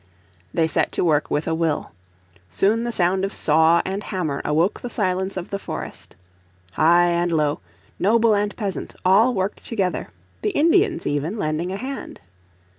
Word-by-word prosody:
They 165 - +2
set 160 - 0
to - - 0
work 155 -3 +2
with. 150 - -1
a 165 - 0
will. 160 -2 -1 0.6
Soon 220 - +1
the 240 - -1
sound 190 -2 +1
of 195 - -1
saw 160 +2 +3
and 195 +2 -3
hammer 155 -8 -3
awoke 165 +6 +1
the 245 - -5
silence 190 -3 -1
of 185 - -6
the 200 - -2
forest. - - -7 0.6
High 175 - +4
and 170 0 0
low, 150 -2 +1 0.4
noble 225 +2 +4
and 205 0 -1
peasant, 200 -4 -4
all 220 +7 +5
worked 190 +1 -2
together, 195 -6 -2 0.3
the - - 0
Indians, 335 +3 +3
even, 145 +8 -1
lending 155 0 -2
a 195 - -3
hand. 265 +5 -6
185 Hz, 165 wpm, -22 LUFS, 160-210 Hz, 0.6 s, all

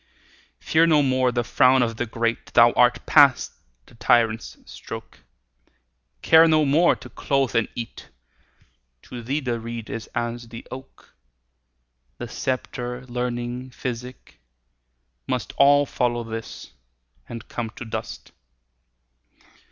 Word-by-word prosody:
Fear 165 +1 +3
no 150 -3 +4
more 130 -1 +2
the 120 0 -1
frown 130 +2 +4
o' 115 -1 -1
the 120 +2 -4
great, 115 +1 -3
Thou 120 0 +7
art 125 0 +2
past 140 -4 +5 0.3
the - - -20
tyrant's 115 -1 +1
stroke; - - -10 1.0
Care 160 0 +7
no 155 -1 +3
more 160 +5 +4
to - - -12
clothe, 135 -4 -1
and 115 - +2
eat; 115 -1 -8 0.9
To 120 - -9
thee 135 +6 -2
the 120 -3 -2
reed 115 -1 -7
is 115 - -6
as 120 0 -3
the 115 0 -10
oak: 130 +1 -12 1.0
The - - -6
sceptre, 125 -1 -4
learning, 125 +1 -4
physic, 125 - -7 0.9
must - - -3
All 145 +1 +5
follow 120 -3 -1
this 115 0 -8 0.6
and 115 -1 -8
come 115 -2 -4
to 120 - -8
dust. 110 - -7
120 Hz, 125 wpm, -23 LUFS, 115-130 Hz, 1.0 s, Thou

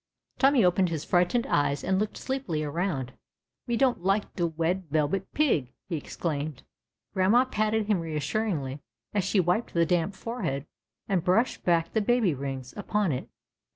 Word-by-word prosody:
Tommy 270 -3 +5
ojoened 180 0 +3
his 160 -2 -3
frightened 180 +7 +2
eyes 145 -1 +1
and 190 +1 +1
looked 210 0 -1
sleej)ily 255 - -2
around. 145 -5 -2 0.6
^^Me 235 - +1
don't 255 -6 +2
lite 195 +2 0
de 175 -2 +1
Wed 170 +3 -1
Yelbet 155 +5 +1
Pig!" 165 - +1 0.2
he 170 - -1
exclaimed. 150 -2 -4 0.5
Grandma 205 +7 +4
patted 215 -2 0
him 205 -3 +2
reassuringly 155 -2 -2 0.3
as 200 -2 +1
she 190 +2 +2
wiped 180 +5 +1
the 170 0 +4
damp 180 +2 0
forehead 160 - -3 0.4
and 185 -4 +1
brushed 220 +8 +2
back 170 -1 +2
the 220 - +2
baby 220 -5 +2
rings 135 -2 -5
upon 205 -3 0
it. 130 - -4
180 Hz, 155 wpm, -28 LUFS, 155-215 Hz, 0.6 s, Tommy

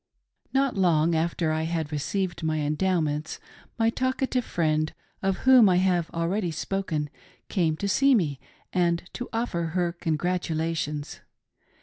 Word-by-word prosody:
NOT 270 -1 +1
long 170 -4 +3
after 165 0 0
I 155 0 0
had 160 -2 -2
received 175 +5 -2
my 155 -1 0
Endowments 155 -1 0 0.4
my 225 -1 +3
talk 260 +2 -1
ative 255 -1 +1
friend, 155 -5 0 0.3
of 195 -1 0
whom 255 -6 +8
I 180 - +4
have 180 -2 +2
already 175 +3 -1
spoken, 165 -2 -2 0.4
came 165 -6 +1
to 200 - -2
see 270 +7 +4
me 150 - 0 0.3
and 170 -2 +2
to 245 - -5
offer 225 -7 -1 0.2
her 175 -1 +1
congratulations. 160 -3 -2
170 Hz, 135 wpm, -26 LUFS, 155-195 Hz, 0.4 s, whom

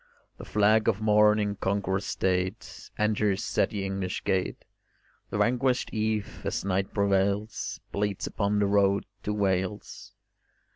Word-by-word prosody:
The - - -8
flag 105 +1 +3
of 105 -2 0
morn 105 0 +4
in 105 -1 -1
conqueror's 95 -1 -1
state 95 +3 -2
Enters 105 -2 0
at - - +4
the 100 -3 -3
English 95 -1 -3
gate: 95 -1 -1 0.6
The - - -3
vanquished 125 +1 +1
eve, 110 -1 -2
as - - -2
night 95 0 0
prevails, 100 +1 0
Bleeds 100 -1 -1
upon 100 0 -1
the 105 - +3
road 100 0 +2 0.2
to 105 - -3
Wales. 100 -1 -2
100 Hz, 135 wpm, -27 LUFS, 95-105 Hz, 0.6 s, morn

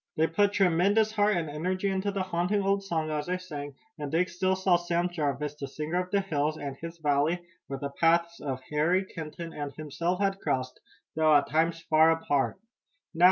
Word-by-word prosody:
They 160 - +4
put 200 +5 +2
tremendous 200 +4 +3
heart 210 -2 +2
and 165 -2 -1
energy 185 +6 -2
into 190 +1 0
the 195 -1 -1
haunting 185 +3 0
old 195 0 +1
song 160 -5 -2
as 150 0 -2
they 180 +1 0
sang, 145 -6 -7 0.2
and 145 -1 -4
Dick 175 +3 +2
still 185 +2 0
saw 190 -1 +3
Sam 175 0 0
Jarvis, 150 -4 -2
the 145 -2 -6
singer 155 +6 -2
of 180 - -14
the 200 +1 +2
hills, 155 -4 -1
and 140 -2 -5
his 165 +4 -8
valley, 155 +3 +1 0.2
where 135 - -4
the 140 +1 -4
paths 170 +3 +2
of 135 -3 -4
Harry 170 +6 +2
Kenton 165 -1 -7
and 145 -1 -4
himself 170 +4 -2
had 195 -1 0
crossed, 130 -6 -2 0.4
though 155 -1 +4
at 145 - +3
times 165 +2 +1
far 160 +1 +5
apart. 145 -3 +1 0.5
"Now!" 165 - -8
165 Hz, 200 wpm, -28 LUFS, 150-185 Hz, 0.5 s, far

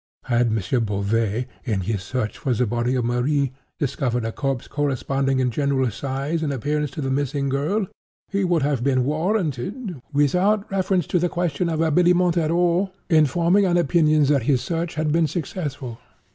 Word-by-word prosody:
Had 120 -1 +2
M. 110 -1 0 0.2
Beauvais, 105 +3 0 0.2
in 110 -7 -1
his 100 +1 -2
search 110 +3 -3
for 130 -4 0
the 125 - +1
body 120 +3 0
of 125 -2 0
Marie, 130 +3 +1 0.3
discovered 125 -4 -1
a 115 - -2
corpse 135 -1 -3
corresponding 135 -1 0
in 130 -1 +1
general 135 -2 0
size 140 - -3
and 150 -3 -1
appearance 145 +3 -1
to 155 - -6
the 135 -1 -1
missing 140 0 -1
girl, 155 +10 0 0.4
he 200 -1 -1
would 175 -5 +2
have 140 -4 0
been 130 -2 +2
warranted 170 - -2
(without 180 +9 +2
reference 190 -3 +1
to 180 - +1
the 175 +1 +1
question 175 -1 -1
of 160 -1 -1
habiliment 175 +2 +3
at 160 -3 +1
all) 175 +3 +2 0.2
in 155 -3 +5
forming 175 +7 +3
an 175 -1 +2
opinion 155 -2 +3
that 140 -1 +3
his 130 -4 +3
search 170 0 -3
had 155 -1 0
been 165 0 +3
successful. 145 -6 -5
145 Hz, 175 wpm, -23 LUFS, 130-170 Hz, 0.4 s, in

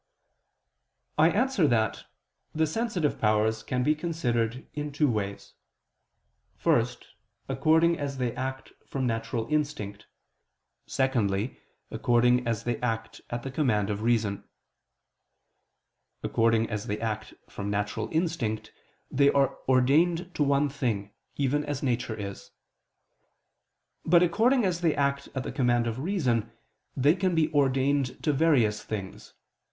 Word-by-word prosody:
I 160 +2 +7
answer 215 - +2
that, 110 -4 0 0.5
The 160 +1 +3
sensitive 180 -3 -1
powers 110 0 +2
can 125 -1 -1
be 150 - +3
considered 130 -7 -1
in 150 0 -4
two 145 +1 +2
ways: 100 -5 -3 1.0
first, 120 +1 0 0.4
according 160 +5 +3
as 140 -1 -3
they 125 -2 -1
act 130 +1 -5
from 135 -2 -2
natural 115 -1 -2
instinct: 145 -10 -2 0.8
secondly, 115 -5 0 0.3
according 125 +1 +2
as 115 -2 -1
they 120 -1 -2
act 115 -2 -3
at 120 0 -4
the 135 - -5
command 110 -8 +1
of 105 0 -3
reason. 110 -4 +1 1.8
According 115 0 +2
as 105 +2 -3
they 105 0 -2
act 110 -2 -4
from 100 0 -5
natural 105 +1 -2
instinct, 145 -11 -1 0.4
they 140 +1 +4
are 140 -1 +2
ordained 165 +8 +3
to - - -4
one 140 0 +3
thing, 115 -8 -2 0.2
even 145 +1 +1
as 145 -1 -4
nature 120 -3 -1
is; 100 -1 -7 1.5
but 170 +2 +5
according 225 +7 +3
as 180 -2 -1
they 165 -3 +2
act 140 0 0
at 130 - -2
the - - -5
command 120 -3 +2
of 115 +1 -3
reason, 130 - 0 0.5
they 140 +4 +5
can 185 -2 0
be 160 -1 +1
ordained 135 -1 +1
to 150 -1 +2
various 135 -9 +3
things. 100 -3 -7
130 Hz, 130 wpm, -27 LUFS, 115-150 Hz, 1.8 s, I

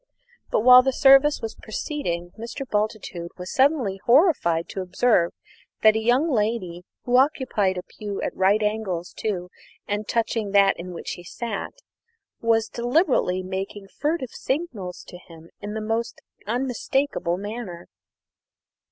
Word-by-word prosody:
But, - - +1
while 250 +2 +9
the 265 +1 +1
service 275 +2 +5
was 225 - -3
proceeding, 175 - -4
Mr. 235 +5 -7
Bultitude 210 -6 -2
was 180 0 -6
suddenly 260 -8 +2
horrified 235 - +4
to 195 - -4
observe 185 -1 +2 0.5
that 215 0 +7
a - - +2
young 245 +7 +2
lady, 210 -7 -1 0.2
who 250 0 +2
occupied 255 -9 +2
a 180 - -4
pew 205 0 -7
at - - -3
right 200 +3 +3
angles 210 -5 -2
to 180 -4 -3 0.4
and 205 +1 -2
touching 225 -3 -1
that 200 -1 +5
in 180 +1 -7
which 175 - -6
he 175 - -7
sat, 220 +3 -5 0.7
was 225 -1 +2
deliberately 240 - +1
making 195 +2 -5
furtive 295 -2 -2
signals 250 - -4
to 180 - -12
him 165 -2 -15
in 210 +1 -5
a - - -3
most 225 +2 -2 0.3
unmistakable 250 -5 -1
manner. 205 -4 -7
215 Hz, 140 wpm, -24 LUFS, 185-250 Hz, 0.7 s, while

